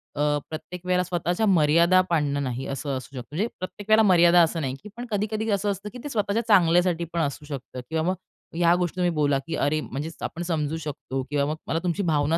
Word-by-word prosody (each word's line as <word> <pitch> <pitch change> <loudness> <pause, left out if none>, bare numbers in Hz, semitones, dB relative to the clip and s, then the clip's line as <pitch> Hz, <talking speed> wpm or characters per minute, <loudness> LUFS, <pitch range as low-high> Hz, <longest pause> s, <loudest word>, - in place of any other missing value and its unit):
अ, 145 - -2 0.3
प्रत्येक 170 +3 -7
वेळेला 180 0 +2
स्वतःच्या 175 +3 -1
मर्यादा 170 0 +5
पाडणं 145 -4 +1
नाही, 130 0 -3
असं 140 +1 -4
असू 130 +2 -10
शकतं. 125 -2 -6
म्हणजे 205 +7 +1
प्रत्येक 200 +3 -7
वेळेला 220 +1 +6
मर्यादा 175 -1 +6
असं 165 0 0
नाही, 130 -2 -2 0.2
पण 240 - -5
कधी-कधी 215 +2 -1
असं 200 0 +1
असतं, 200 +2 -6
की - - -7
ते 290 - -5
स्वतःच्या 210 -2 0
चांगल्यासाठीपण 170 -3 +3
असू 145 0 -3
शकतं 135 -3 -7
किंवा 160 0 0
मग 185 - 0 0.4
ह्या 170 0 +4
गोष्टी 180 -1 -1
तुम्ही 180 -1 +1
बोला, 145 -3 +1
की 165 - -2
अरे, 150 +1 +1
म्हणजे 145 +3 -5
आपण 170 - -4
समजू 155 -1 -1
शकतो 145 -3 -4
किंवा 145 -1 +1
मग - - -2
मला 165 - 0
तुमची 180 +3 0
भावना 150 +2 +2
170 Hz, 210 wpm, -25 LUFS, 150-185 Hz, 0.4 s, वेळेला